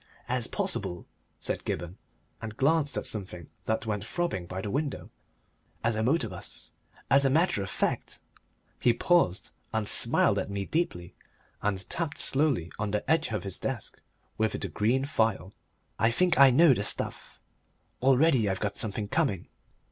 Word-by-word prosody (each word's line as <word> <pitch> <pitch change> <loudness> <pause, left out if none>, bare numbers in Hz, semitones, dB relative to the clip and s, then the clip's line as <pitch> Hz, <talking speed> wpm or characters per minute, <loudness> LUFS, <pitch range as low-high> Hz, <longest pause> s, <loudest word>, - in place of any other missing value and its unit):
"As - - +1
possible," 90 0 -2 0.3
said - - -3
Gibberne, 85 +1 -4 0.4
and 110 -1 -7
glanced 145 +1 +2
at - - -3
something 90 -6 -5
that 110 +1 -1
went 105 -2 -2
throbbing 110 - -3
by 95 +1 -5
the 100 +1 -4
window, 145 0 -3 0.7
"as 115 0 +1
a 110 - -1
motor 125 +2 +1
bus. 90 -2 -9 0.4
As 135 +1 +6
a 135 - +3
matter 155 - +2
of 95 - -4
fact - - -2 0.3
" - - -41
He 120 - +4
paused 165 - +1 0.2
and 110 -2 -1
smiled - - +4
at - - -4
me 100 -1 -3
deeply, 90 - -2 0.5
and 95 -3 -2
tapped 165 -4 -3
slowly 135 - +2
on 105 -1 -1
the 105 +1 -2
edge 160 0 +2
of 110 - -2
his 95 -2 -1
desk - - -5 0.4
with 110 -1 +1
the - - -4
green 125 +6 +1
phial. 110 -8 0 0.5
"I 110 +1 +4
think 175 +7 +2
I 135 -1 +9
know 140 +3 +6
the 100 - -2
stuff.... - - -1 0.6
Already 130 -3 +4
I've 95 - -2
got 100 -1 -3
something 105 -1 -2
coming." 135 - -1
110 Hz, 165 wpm, -28 LUFS, 100-140 Hz, 0.7 s, I